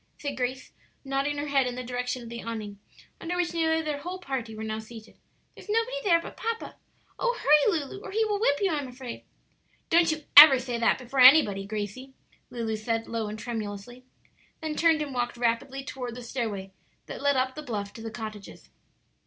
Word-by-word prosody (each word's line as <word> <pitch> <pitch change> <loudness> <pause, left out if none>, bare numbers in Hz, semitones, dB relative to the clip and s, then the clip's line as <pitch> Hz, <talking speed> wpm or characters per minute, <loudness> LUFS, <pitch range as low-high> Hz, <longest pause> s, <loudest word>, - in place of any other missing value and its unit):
said 285 -2 -4
Grace, 255 0 -3 0.3
nodding 275 +2 -1
her 290 - -2
head 270 -2 +2
in 245 - -4
the 255 - -5
direction 250 0 -3
of 230 - -9
the 235 0 -6
awning 215 -3 -6 0.4
under 345 +2 -4
which 355 -1 -1
nearly 320 -1 +1
their 300 -2 -3
whole 355 +5 -5
party 265 -10 -5
were 220 - -6
now 220 0 -3
seated: 220 0 -12 0.4
"there's - - -15
nobody 455 +3 0
there 345 -5 +4
but 335 - -9
papa. 455 0 -4 0.4
Oh - - 0
hurry, 300 +6 +4
Lulu, 290 +7 -7
or - - -7
he 440 +3 +1
will 415 -1 -1
whip 285 -10 +3
you, 390 -2 +1
I'm 290 -4 -2
afraid." 250 -1 -9 0.7
"Don't 335 0 +5
you 310 -1 -4
ever 290 -2 +12
say 245 -1 -3
that 230 - +3
before 260 +1 -5
anybody, 250 -8 +7
Gracie," 215 +5 -5 0.4
Lulu 225 -2 -3
said, 225 +1 -2
low 230 -2 -3
and 210 +1 -6
tremulously; 225 +1 -6 0.6
then 315 -1 -3
turned 320 -2 +3
and 285 -2 -7
walked 245 -1 -2
rapidly 240 +3 -1
toward 250 -3 -6
the 250 - -8
stairway 220 -6 -4 0.3
that - - -8
led 285 0 +2
up 260 0 +1
the 305 - -7
bluff 210 -8 -5
to 225 - -10
the 225 - -5
cottages. 215 -3 -9
255 Hz, 200 wpm, -27 LUFS, 230-305 Hz, 0.7 s, ever